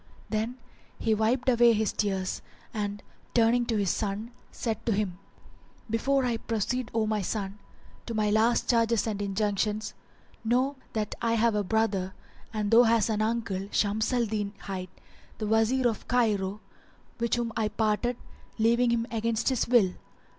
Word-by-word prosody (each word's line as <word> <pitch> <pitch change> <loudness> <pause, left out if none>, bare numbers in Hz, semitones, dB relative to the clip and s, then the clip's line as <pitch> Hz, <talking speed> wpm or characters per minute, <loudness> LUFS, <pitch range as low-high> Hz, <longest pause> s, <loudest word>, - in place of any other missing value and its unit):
Then 225 +3 -1 0.4
he 220 - +1
wiped 230 +4 +1
away 240 -2 +6
his 215 -2 0
tears 190 -3 -1 0.3
and, 205 -1 -3 0.3
turning 235 +1 +4
to 225 - +1
his 200 -3 +1
son, 215 +2 -3 0.2
said 225 -2 -3
to - - +3
him, 195 -3 -1 0.7
"Before 265 +4 +2
I 235 -2 0
proceed, 230 +2 -2
O 225 -1 +2
my 215 -1 0
son, 195 +1 -3 0.5
to 230 - -3
my 210 -1 +2
last 225 +3 +3
charges 230 -2 +3
and 210 -3 -2
injunctions, 210 +1 -1 0.5
know 255 +5 +2 0.2
that 215 -1 -2
I 230 -1 +1
have 230 0 +3
a 210 -1 +1
brother, 200 -3 0 0.4
and 210 -2 -2
thou 230 +1 +8
hast 230 -2 +3
an 215 -1 0
uncle, 220 -4 -1
Shams 215 +3 +1
al 245 -2 +2
Din 205 -2 -2
hight, 185 -2 -5 0.5
the 215 - -3
Wazir 225 +4 +3
of 225 -3 -3
Cairo, 210 -4 +1 0.6
which 235 0 +1
whom 235 -2 -2
I 220 -2 +1
parted, 220 +3 0 0.4
leaving 235 +2 +3
him 235 -1 +1
against 230 +1 0
his 260 -3 0
will. 225 -7 +4
220 Hz, 160 wpm, -28 LUFS, 210-235 Hz, 0.7 s, thou